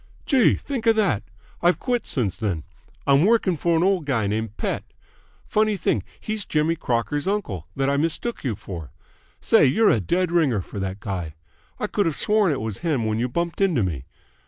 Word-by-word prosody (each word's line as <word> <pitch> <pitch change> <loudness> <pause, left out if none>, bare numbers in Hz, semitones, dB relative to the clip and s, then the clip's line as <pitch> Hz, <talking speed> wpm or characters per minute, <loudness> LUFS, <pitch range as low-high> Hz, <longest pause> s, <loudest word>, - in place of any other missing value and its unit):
"Gee! 260 -5 +4
Think 250 -5 -4
of 225 - +6
that! 185 - +2 0.4
I've 175 +1 +4
quit 245 -2 -1
since 110 -9 -1
then. 95 -9 -2 0.4
I'm 140 +2 +5
working 205 -3 +3
for 170 +1 +1
an 165 - +2
old 190 -4 +2
guy 120 -6 +1
named 110 +1 -2
Pett. - - -2 0.6
Funny 215 -1 +1
thing, 115 - +1 0.2
he's 215 -1 -3
Jimmy 155 -1 +1
Crocker's 145 +2 -1
uncle 110 - -2
that 135 0 0
I 140 0 +2
mistook 165 +10 -2
you 125 -6 -1
for. 90 -6 -8 0.5
Say, - - +5
you're 210 - +4
a 115 - +3
dead 175 - 0
ringer 145 - +2
for 100 - -8
that 95 +1 -4
guy! 90 -6 -4 0.4
I - - -1
could 205 -4 0
have 160 - -1
sworn 210 -4 +2
it 140 - -2
was 110 -3 -4
him 150 -9 0
when 110 0 0
you 125 +2 0
bumped 170 +7 -2
into 170 - +3
me. 75 -9 -3
145 Hz, 195 wpm, -23 LUFS, -, 0.6 s, of